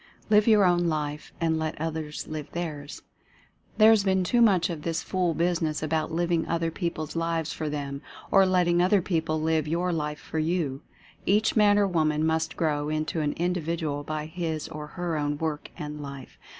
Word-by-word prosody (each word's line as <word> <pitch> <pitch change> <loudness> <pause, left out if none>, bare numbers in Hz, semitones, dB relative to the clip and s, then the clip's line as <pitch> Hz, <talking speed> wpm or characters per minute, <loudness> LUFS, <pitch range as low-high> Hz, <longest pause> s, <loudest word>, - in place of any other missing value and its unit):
LIVE 210 +1 +5
YOUR 215 -3 +6
OWN 175 -1 +3
LIFE 150 -1 -3
AND 160 -1 +1
LET 160 -1 -3
OTHERS 160 -1 -4
LIVE 155 -2 -6
THEIRS. 150 -4 -5 0.7
There 220 0 +8
has 215 -3 +4
been 190 -1 +2
too 240 +7 +2
much 190 -6 +4
of 160 -3 -5
this 165 +1 -2
fool 180 -3 0
business 165 -2 0
about 155 +1 -1
living 170 0 0
other 165 -1 0
people's 165 -3 -4
lives 165 -1 -1
for 155 - -3
them, 140 -1 -4 0.3
or 195 - +7
letting 175 -2 +3
other 185 +1 +3
people 160 -3 0
live 160 -1 +1
your 175 +3 0
life 150 -2 -2
for 160 - -4
you. 155 -4 -1 0.5
Each 210 +3 +3
man 205 -2 +5
or 205 - +4
woman 155 -4 +1
must 160 0 0
grow 150 -2 0
into 155 +1 -1
an 145 -1 0
Individual 165 -4 -2
by 155 0 -4
his 160 -2 -3
or 150 -1 -7
her 175 -3 -1
own 145 0 -1
work 155 -1 -3
and 150 -2 -6
life. 140 -2 -9
160 Hz, 185 wpm, -27 LUFS, 155-175 Hz, 0.7 s, There